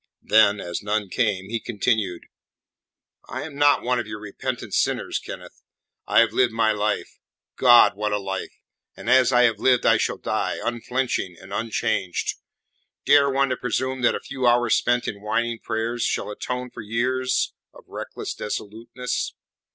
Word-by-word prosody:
Then, 105 -2 +4
as 85 -2 -4
none 105 -1 -1
came, 100 -4 -1
he 115 - -1
continued: 105 -5 -1 1.1
"I - - -4
am 155 -1 -8
not 145 0 +4
one 125 0 +1
of 115 - -4
your 105 0 -6
repentant 105 -1 -5
sinners, - - 0
Kenneth. - - -10 0.5
I - - +5
have - - +1
lived 125 -3 +2
my 110 -1 +2
life 105 0 -2 0.4
God, 120 -5 +6
what 105 +1 -2
a 105 - +1
life! 95 -2 -4 0.5
and - - -10
as 130 -1 +5
I 125 -1 +5
have 115 -2 +2
lived 125 -2 +3
I - - +5
shall - - -1
die, - - -2
unflinching 120 -6 -2
and 95 0 -11
unchanged. 110 -4 -1 0.7
Dare 140 -1 +5
one 135 0 +1
to 130 - -1
presume 130 +1 -2
that 120 - +3
a - - -3
few 130 -2 -2
hours 120 0 +4
spent 120 0 +1
in 100 -1 -5
whining 115 +2 -1
prayers 115 +2 -3
shall 105 - -1
atone 125 +3 -5
for - - -8
years 125 +4 0 0.2
of - - -16
reckless - - -6
dissoluteness? 115 +4 -4
115 Hz, 165 wpm, -23 LUFS, 105-125 Hz, 1.1 s, God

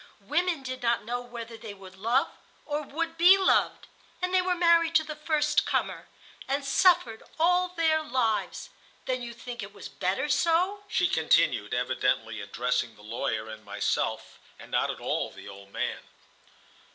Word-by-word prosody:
"Women 330 - 0
did 255 0 -5
not 235 -3 +1
know 245 +2 -2
whether 235 -1 -8
they 220 -2 -9
would 190 -1 -13
love 230 +7 +1 0.4
or 295 0 -2
would 330 +3 -4
be 360 +3 +8
loved, 385 - +2 0.3
and 365 0 -2
they 370 - +5
were 365 0 0
married 335 -1 +4
to 315 - +5
the 305 -1 -6
first 305 0 +1
comer, - - -2 0.4
and 275 +1 -1
suffered 275 -6 +3 0.2
all 360 +2 +3
their 325 -3 +2
lives. 250 -7 -1 0.3
Then 255 -1 -1
you 240 -1 -6
think 240 +1 -8
it 200 0 -9
was - - -9
better - - -1
so?" 360 +5 +2
she 375 -4 +2
continued, 375 - +2
evidently - - 0
addressing 125 -2 -2
the 105 - -17
lawyer 110 0 -3
and 110 0 -9
myself, 100 - -2 0.2
and - - -13
not - - +1
at - - -4
all - - -1
the - - -12
old 100 0 -12
man. - - -2
275 Hz, 165 wpm, -28 LUFS, 225-335 Hz, 0.4 s, be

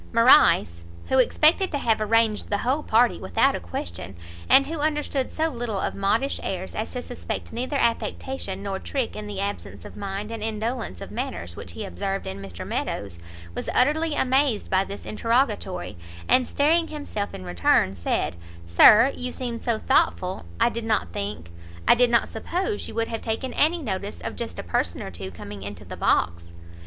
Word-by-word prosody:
Morrice, 185 - +5 0.3
who 265 - +4
expected 315 +8 +4
to 290 - 0
have 225 -5 +1
arranged 220 0 +2
the 205 - +1
whole 260 +8 0
party 240 -2 +3
without 95 - +2
a - - -3
question, 85 +1 -6 0.3
and 275 - +7
who 320 +2 -5
understood 295 -3 -1
so 320 +1 0
little 240 -6 -3
of - - -1
modish 215 +7 0
airs 190 0 -4
as 215 - -3
to 250 -1 -4
suspect 245 - -5
neither 255 +5 -3
affectation 230 -4 -2
nor 195 -1 -3
trick 265 -4 -3
in 210 0 -6
the 205 -2 -5
absence 100 - -5
of - - -10
mind 200 +2 -5
and 225 -1 -5
indolence 220 - -3
of - - -8
manners 85 +1 -4
which 90 - -8
he - - -5
observed 195 - -3
in 95 +1 -5
Mr 95 -4 -7
Meadows, 100 -4 -3 0.3
was - - -4
utterly 300 +4 +3
amazed 265 -4 +1
by 190 0 +4
this 200 +1 -8
interrogatory, 225 -5 0 0.3
and 255 -1 +4
staring 325 +4 +2
himself 290 -10 -4
in - - -8
return, 90 +2 +2
said, 85 -2 -1 0.3
"Sir, 210 - +7
you 250 0 -3
seemed 240 -3 -4
so 235 -2 +1
thoughtful 185 - +1
I - - +4
did 235 -1 -4
not 215 - 0
think 100 -4 -4 0.4
I - - +9
did 245 0 +4
not 235 -1 +3
suppose 365 - -3
you - - -9
would 230 0 0
have 225 - -4
taken 230 +4 -3
any 325 +2 +2
notice 200 -2 -4
of - - -5
just 235 - -5
a - - -4
person 85 0 -1
or 95 - -6
two 95 +2 -7
coming 100 +3 -9
into 100 +1 -7
the - - -7
box." 85 0 0
220 Hz, 185 wpm, -25 LUFS, -, 0.4 s, I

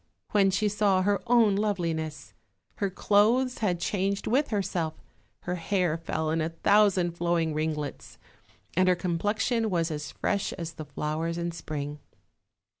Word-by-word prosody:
when 200 -2 +4
she 195 +3 +1
saw 200 -2 +2
her 200 -1 +1
own 230 -4 +5
loveliness. 170 -7 -2 0.4
Her 200 - 0
clothes 220 +7 +2
had 185 -6 0
changed 195 +2 -1
with 270 +6 +2
herself; 180 -6 -1 0.5
her 180 - -3
hair 180 -2 0
fell 160 -1 -2
in 165 0 +1
a 160 - 0
thousand 190 0 +3
flowing 170 -2 0
ringlets, 155 -1 -3 0.6
and 185 +1 +4
her 180 - +4
com 175 -1 -2
plexion 220 +3 0
was 170 -4 0
as 150 -2 -5
fresh 200 0 -1
as 165 -1 -6
the 155 -1 -8
flowers 155 +3 -3
in 170 0 -2
spring. 150 -3 -5
180 Hz, 150 wpm, -28 LUFS, 160-205 Hz, 0.6 s, own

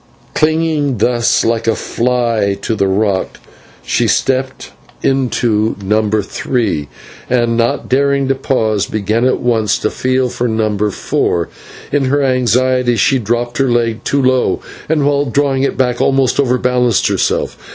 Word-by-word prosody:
Clinging 155 -4 +1
thus 120 +2 +1
like 115 0 0
a 115 - +2
fly 115 -5 0
to - - -1
the 100 -2 0
rock, 95 0 -1 0.5
she - - 0
stepped 130 0 -1 0.3
into 120 -5 +1
No. 105 +2 0
3, 100 - -2 0.4
and, 120 -2 +1
not 115 0 0
daring 140 +1 +1
to 135 - +2
pause, 110 -6 0
began 110 +3 -1
at 130 - +1
once 110 -4 +1
to 110 - -2
feel 130 0 0
for 120 +1 -2
No. 110 -2 0
4. 85 -3 -1 0.4
In 145 -1 +1
her 140 +2 +1
anxiety 125 -1 +2
she 130 +5 +2
dropped 120 +2 -2
her 135 -1 +2
leg 115 -1 0
too 140 -1 0
low, 130 0 +1 0.3
and 155 -3 +1
while 145 0 +1
drawing 135 +1 0
it 140 - -1
back 125 -2 0
almost 135 -1 +2
overbalanced 125 -3 +2
herself. - - -1
125 Hz, 145 wpm, -15 LUFS, 110-135 Hz, 0.5 s, a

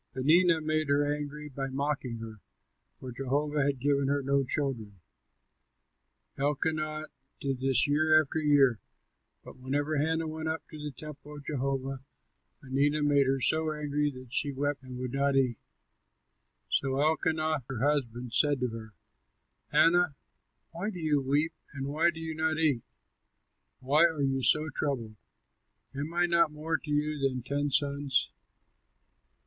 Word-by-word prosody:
Peninnah 160 +5 +4
made 155 -1 0
her 145 +1 +3
angry 150 0 -6
by 135 -1 -4
mocking 135 -3 -2
her, 110 -2 -9 0.6
for 130 - -7
Jehovah 145 +4 -1
had 140 -1 0
given 140 +1 +1
her 140 0 0
no 140 +1 +2
children. 120 -8 -3 1.4
Elkanah 155 +2 -1 0.3
did 135 -2 -2
this 130 -1 +2
year 155 +2 +4
after 155 +1 -1
year; 140 -6 +4 0.6
but - - -13
whenever 145 +4 -1
Hannah 160 +2 0
went 160 0 -4
up 160 0 -3
to 155 - -9
the 150 0 -4
temple 150 +2 -10
of 145 -1 -11
Jehovah, 135 -1 -2 0.6
Peninnah 145 +3 +1
made 145 -2 +3
her 135 0 +1
so 160 +5 +2
angry 150 -1 -1
that 130 -2 -11
she 145 - +1
wept 145 +1 -2
and 130 -1 -9
would 125 -1 -4
not 140 0 +1
eat. 130 -4 +2 1.1
So 135 - 0
Elkanah 155 0 +1
her 125 -4 -4
husband 125 -5 -1
said 145 -2 +3
to 125 - +1
her, 110 -1 -9 0.8
"Hannah, 175 -2 +4 0.6
why 175 +5 -3
do 195 - -7
you 150 -3 +1
weep 145 +4 +1 0.2
and 135 -1 -4
why 155 +5 +2
do 165 -1 -6
you 160 0 -4
not 160 0 0
eat? 150 -7 +2 1.0
Why 145 +6 +4
are 160 -4 0
you 135 -1 +1
so 155 +4 +4
troubled? 120 -8 -2 0.8
Am 145 +4 -4
I 175 +1 +2
not 170 -2 +3
more 155 +1 -2
to 150 - -11
you 150 0 0
than 130 -3 -1
ten 145 +2 -1
sons?" 140 -1 +1
145 Hz, 150 wpm, -29 LUFS, 135-155 Hz, 1.4 s, Peninnah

